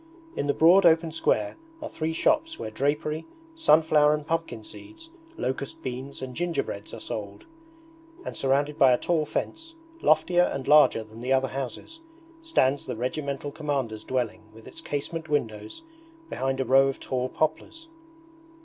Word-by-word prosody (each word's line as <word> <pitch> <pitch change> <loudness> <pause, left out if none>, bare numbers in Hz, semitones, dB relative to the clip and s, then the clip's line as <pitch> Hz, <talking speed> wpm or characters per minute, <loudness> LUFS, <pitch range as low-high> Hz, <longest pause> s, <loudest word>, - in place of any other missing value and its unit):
In 145 - -2
the 145 - +2
broad 175 +5 +6
open 165 -1 +4
square 105 -9 0 0.2
are 305 - -5
three 160 +1 -3
shops 315 - +1
where 110 - -6
drapery, 150 +6 -1 0.3
sunflower 155 - +4
and 150 -1 -7
pumpkin 165 -9 -3
seeds, 325 - -12 0.3
locust 130 +1 -4
beans 130 +1 -6
and 130 -1 -7
gingerbreads 175 0 -3
are - - -8
sold; 345 - -7 0.8
and - - -5
surrounded 140 +2 0
by 130 -2 +7
a - - +3
tall 160 0 0
fence, 325 - -4 0.3
loftier 160 +3 +4
and 135 -2 -4
larger 150 -6 +6
than 110 +1 -13
the 125 +2 -3
other 135 0 +2
houses, 135 - -6 0.4
stands 145 - +1
the - - -3
Regimental 140 +3 -3
Commander's 135 -8 -3
dwelling 120 -4 -2
with 110 0 -15
its - - -11
casement 155 +3 -4
windows, 110 - -3 0.5
behind 135 0 -2
a 135 - 0
row 135 +2 +5
of 135 - -3
tall 130 0 -2
poplars. 325 - -2
145 Hz, 155 wpm, -26 LUFS, 130-165 Hz, 0.8 s, by